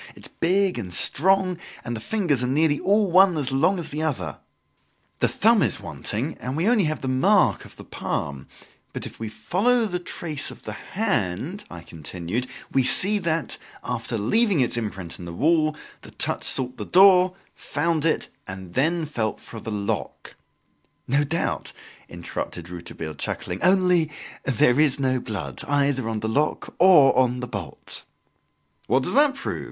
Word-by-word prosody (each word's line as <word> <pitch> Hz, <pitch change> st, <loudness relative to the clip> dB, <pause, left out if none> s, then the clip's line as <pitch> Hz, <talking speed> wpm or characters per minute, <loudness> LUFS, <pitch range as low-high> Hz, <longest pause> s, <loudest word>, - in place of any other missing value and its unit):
It -, -, -15 dB
is -, -, -5 dB
big 185 Hz, -2 st, +2 dB
and 95 Hz, -6 st, -6 dB
strong 185 Hz, -, +3 dB, 0.3 s
and 120 Hz, 0 st, -3 dB
the -, -, -5 dB
fingers 170 Hz, -, 0 dB
are -, -, 0 dB
nearly 145 Hz, +2 st, +2 dB
all 205 Hz, -1 st, +2 dB
one 185 Hz, -1 st, +6 dB
as 140 Hz, -2 st, 0 dB
long 160 Hz, +9 st, +2 dB
as 170 Hz, -, -5 dB
the 150 Hz, +2 st, -4 dB
other! 155 Hz, -4 st, -3 dB, 0.8 s
The -, -, +3 dB
thumb -, -, +3 dB
is -, -, +1 dB
wanting 130 Hz, +10 st, -3 dB
and 130 Hz, +3 st, -4 dB
we 165 Hz, -, 0 dB
have 220 Hz, -, +4 dB
only 200 Hz, -10 st, +3 dB
the 145 Hz, -3 st, -4 dB
mark 130 Hz, 0 st, +3 dB
of -, -, -13 dB
the -, -, -11 dB
palm; 70 Hz, -2 st, -4 dB, 0.5 s
but -, -, -5 dB
if -, -, -10 dB
we 110 Hz, -1 st, -4 dB
follow 225 Hz, -, +1 dB
the 180 Hz, -4 st, -2 dB
trace 160 Hz, -4 st, -3 dB
of -, -, -12 dB
the 110 Hz, -, -6 dB
hand," 180 Hz, -, -2 dB
I 85 Hz, -, -9 dB
continued, 85 Hz, -, -5 dB, 0.2 s
"we 135 Hz, -, +3 dB
see 200 Hz, +11 st, +4 dB
that, 165 Hz, -3 st, -2 dB, 0.2 s
after 115 Hz, -, -3 dB
leaving 200 Hz, -, +2 dB
its 125 Hz, -2 st, +1 dB
imprint 95 Hz, -7 st, -4 dB
on 90 Hz, -, -8 dB
the 85 Hz, -, -7 dB
wall, 155 Hz, -, +2 dB, 0.3 s
the -, -, -12 dB
touch -, -, -1 dB
sought 130 Hz, -1 st, 0 dB
the -, -, -4 dB
door, 185 Hz, -1 st, +6 dB, 0.2 s
found 160 Hz, +1 st, -1 dB
it, 160 Hz, -1 st, +1 dB, 0.2 s
and 95 Hz, -2 st, -8 dB
then 160 Hz, +5 st, +1 dB
felt 115 Hz, -8 st, -3 dB
for 115 Hz, -, -9 dB
the 110 Hz, -, -7 dB
lock 100 Hz, -2 st, -4 dB, 0.4 s
" -, -, -43 dB
"No 140 Hz, +3 st, +2 dB
doubt," 160 Hz, +4 st, -2 dB, 0.4 s
interrupted 85 Hz, 0 st, -6 dB
Rouletabille, 85 Hz, -2 st, -7 dB
chuckling, 90 Hz, +4 st, -4 dB
"only 180 Hz, -4 st, +3 dB, 0.4 s
there 125 Hz, 0 st, +3 dB
is 145 Hz, -3 st, +3 dB
no 130 Hz, -1 st, +1 dB
blood, 95 Hz, -, -5 dB
either 140 Hz, -4 st, +1 dB
on 110 Hz, -1 st, -3 dB
the 110 Hz, -, -2 dB
lock 145 Hz, +7 st, -1 dB
or 170 Hz, -7 st, +7 dB
on 125 Hz, -1 st, +2 dB
the 125 Hz, -, -5 dB
bolt!" 100 Hz, -, -7 dB, 0.8 s
"What 130 Hz, +4 st, +2 dB
does -, -, -2 dB
that 285 Hz, +1 st, +4 dB
prove?" 275 Hz, -, -4 dB
145 Hz, 175 wpm, -24 LUFS, 110-180 Hz, 0.8 s, or